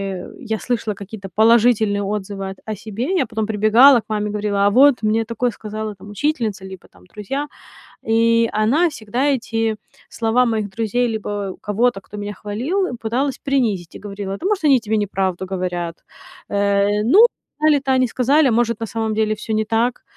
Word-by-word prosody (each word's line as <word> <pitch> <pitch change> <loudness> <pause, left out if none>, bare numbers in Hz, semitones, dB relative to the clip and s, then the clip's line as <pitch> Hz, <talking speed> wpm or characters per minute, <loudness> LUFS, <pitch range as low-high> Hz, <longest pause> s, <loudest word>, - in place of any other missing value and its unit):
э, 180 - -9
я 220 -4 -3
слышала 225 -4 -2
какие-то 200 0 -9
положительные 220 -2 +3
отзывы 195 -1 -4
о 190 - -7 0.2
о - - -3
себе, 215 +2 -6
я - - +2
потом 220 -1 -2
прибегала 220 +5 +6
к - - -36
маме, 210 -1 -1
говорила: 205 -1 0
"А - - +5
вот 260 +2 +5
мне 220 +1 +2
такое 235 +2 -1
сказала, 215 0 -6
там, 195 +2 -13
учительница, 220 -4 -2
либо, 190 -1 -11
там, 90 -1 -21
друзья". 270 - -5 0.6
И 230 +1 +3
она 230 +12 +3
всегда 245 -1 -3
эти 225 -5 -1 0.3
слова 235 +2 +1
моих 220 -3 -1
друзей 230 +4 -1
либо 205 -3 -4
кого-то, 210 0 0
кто 210 - -11
меня 205 0 -5
хвалил, 250 - -2
пыталась 255 +5 -1
принизить, 225 - -1
и - - -8
говорила: 200 -1 -6
"Да - - -8
может 410 -4 0
они 275 -3 +5
тебе 220 -1 -2
неправду 190 -3 -1
говорят. 175 -3 -3 0.5
Э, 200 0 +1
ну, 380 - +7 0.3
сказали-то 290 -3 +2
они 255 -1 +3
сказали, 270 +5 +2
а - - +2
может 230 -1 +1
на 225 - -3
самом 220 +1 -3
деле 215 0 +1
всё 215 +1 -7
не 215 0 0
так". 230 +3 0
220 Hz, 180 wpm, -20 LUFS, 205-245 Hz, 0.6 s, ну